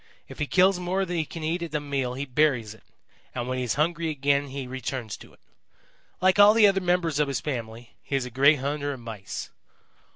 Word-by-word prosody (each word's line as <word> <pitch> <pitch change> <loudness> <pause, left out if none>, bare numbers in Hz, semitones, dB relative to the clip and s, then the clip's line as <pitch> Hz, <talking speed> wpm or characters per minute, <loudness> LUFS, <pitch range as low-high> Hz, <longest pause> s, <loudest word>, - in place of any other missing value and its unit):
If - - -12
he 150 - -1
kills 190 +2 +4
more 185 +2 -1
than 175 -1 -4
he 160 -2 0
can 165 +1 -8
eat 165 +3 -1
at 165 -3 -5
a - - +2
meal 135 -4 -2
he 140 +2 -3
buries 125 -5 +1
it, 110 - -19 0.5
and 120 - -3
when 130 0 -2
he - - -1
is 120 - -1
hungry 165 +2 0
again 140 -1 +1
he 135 0 -6
returns 125 -3 -5
to - - -15
it. - - -23 0.8
Like 185 +2 +3
all 205 +1 +8
the 225 -2 +7
other 195 -1 +3
members 175 -4 +1
of 150 - +2
his 140 - -1
family, 115 -4 -6
he 140 - -4
is 135 -2 0
a 125 - -8
great 140 +5 +5
hunter 145 +1 -2
of 130 - -9
Mice. 110 -4 -7
145 Hz, 230 wpm, -26 LUFS, 130-170 Hz, 0.8 s, all